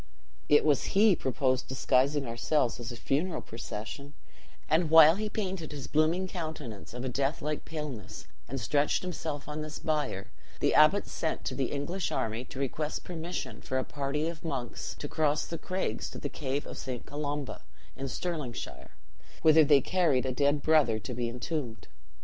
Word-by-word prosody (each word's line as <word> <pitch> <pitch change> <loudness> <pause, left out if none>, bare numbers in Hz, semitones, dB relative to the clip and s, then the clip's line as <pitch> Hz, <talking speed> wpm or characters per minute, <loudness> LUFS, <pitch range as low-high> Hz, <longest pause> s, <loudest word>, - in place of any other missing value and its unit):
It 150 - +6
was 150 +5 +2
he 210 -2 +7
proposed 130 -1 0
disguising 135 +2 +2
ourselves 120 +2 0
as 120 +1 -5
a - - -6
funeral 155 +9 0
procession; 115 +6 -7 0.5
and 160 +1 +3
while 160 0 +9
he 215 0 -2
painted 190 -7 -3
his 145 -2 -6
blooming 160 +5 +2
countenance 155 - -6
of 125 +1 -4
a - - 0
death 135 +4 0
like 150 +1 -3
paleness 150 - -6 0.2
and 135 +2 -3
stretched 145 +8 +1
himself 160 -5 -4
on 150 +1 -4
this 155 0 -5
bier, 150 -11 -2 0.3
the - - +2
abbot 155 +7 +6
sent 160 - -3
to - - -1
the 135 0 0
English 160 +7 -2
army 110 +2 -1
to - - -10
request 150 +3 -2
permission 175 0 -5
for 130 - -2
a 130 - +1
party 145 +3 -2
of 165 -1 -6
monks 135 -7 -4
to 145 - -5
cross 150 -1 +1
the 165 - -5
craigs 185 - -2
to - - -8
the 145 - -4
cave 140 -1 -3
of - - -7
St. 125 -3 -5
Colomba, 145 -1 -4 0.3
in 135 +1 -4
Stirlingshire, 130 - -5 0.5
whither 160 0 +8
they 145 -2 +6
carried 155 -6 +2
a 130 - 0
dead 140 +2 +2
brother 150 -8 +4
to 110 +4 -6
be 120 0 -1
entombed. 125 -1 -4
145 Hz, 175 wpm, -30 LUFS, 130-160 Hz, 0.5 s, while